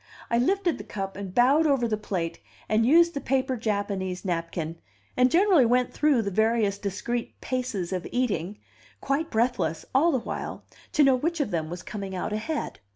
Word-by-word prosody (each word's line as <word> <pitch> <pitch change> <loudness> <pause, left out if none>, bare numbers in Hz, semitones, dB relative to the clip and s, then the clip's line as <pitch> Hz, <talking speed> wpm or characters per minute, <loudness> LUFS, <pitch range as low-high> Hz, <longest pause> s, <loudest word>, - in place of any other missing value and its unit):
I 235 - +3
lifted 370 +6 +1
the - - -6
cup, 195 -1 -5
and 195 -1 -6
bowed 270 - +4
over 270 -5 +2
the 220 - 0
plate, 185 -5 -3 0.3
and 220 +2 +2
used 335 +4 +5
the 280 - -3
paper 260 -1 0
Japanese 200 -4 -2
napkin, 165 -2 -3 0.4
and 250 0 +4
generally 360 -2 +5
went 245 +1 +2
through 290 -6 +3
the 200 - -2
various 220 -1 +1
discreet 210 +5 -4
paces 240 -9 -3
of 185 -1 -3
eating, 205 -6 -1 0.4
quite 295 +4 -1
breathless, 195 -9 0
all 305 +6 +4
the 270 - +2
while, 235 - -5 0.3
to 300 - +5
know 270 -1 +6
which 330 +6 -1
of 280 -8 -1
them 160 -2 -2
was 175 +1 -6
coming 195 -2 -6
out 185 +3 -3
ahead. 255 +9 -3
230 Hz, 180 wpm, -26 LUFS, 195-270 Hz, 0.4 s, know